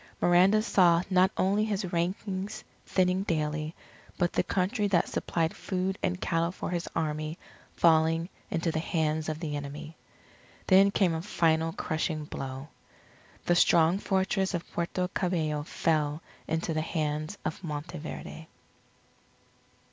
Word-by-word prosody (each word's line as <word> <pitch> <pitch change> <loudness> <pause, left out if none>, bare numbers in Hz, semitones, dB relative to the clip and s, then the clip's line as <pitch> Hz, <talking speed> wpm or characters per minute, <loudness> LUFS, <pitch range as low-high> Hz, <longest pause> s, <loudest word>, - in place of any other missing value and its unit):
Miranda 185 +5 +5
saw 175 -5 +4
not 185 0 +5
only 200 +3 +2
his 200 -4 -2
ranks 190 +4 -2 0.2
thinning 185 0 +2
daily, 155 -3 -2 0.4
but 175 -2 +1
the - - +3
country 205 +3 0
that 180 -4 +2
supplied 165 -1 -1
food 190 0 -2
and 180 -1 -1
cattle 165 -1 0
for 180 - -5
his 175 -1 -2
army, 155 0 -2 0.4
falling 165 0 +3 0.2
into 170 -5 0
the 160 - -1
hands 160 -1 -1
of 155 0 -3
the 155 -3 -3
enemy. 145 +2 -6 0.7
Then 195 +1 +6
came 190 -4 +2
a 160 - -2
final 165 -4 +1
crushing 155 -1 -2
blow: 135 0 -6 0.8
The 175 - +3
strong 170 +1 +4
Fortress 190 -1 0
of 170 - -4
Puerto 175 +1 -1
Cabello 165 -6 -1
fell 150 0 0 0.2
into 165 +1 -1
the 155 - 0
hands 155 +2 -2
of 160 - -4
Monteverde. 155 0 -6
170 Hz, 135 wpm, -29 LUFS, 155-185 Hz, 0.8 s, Then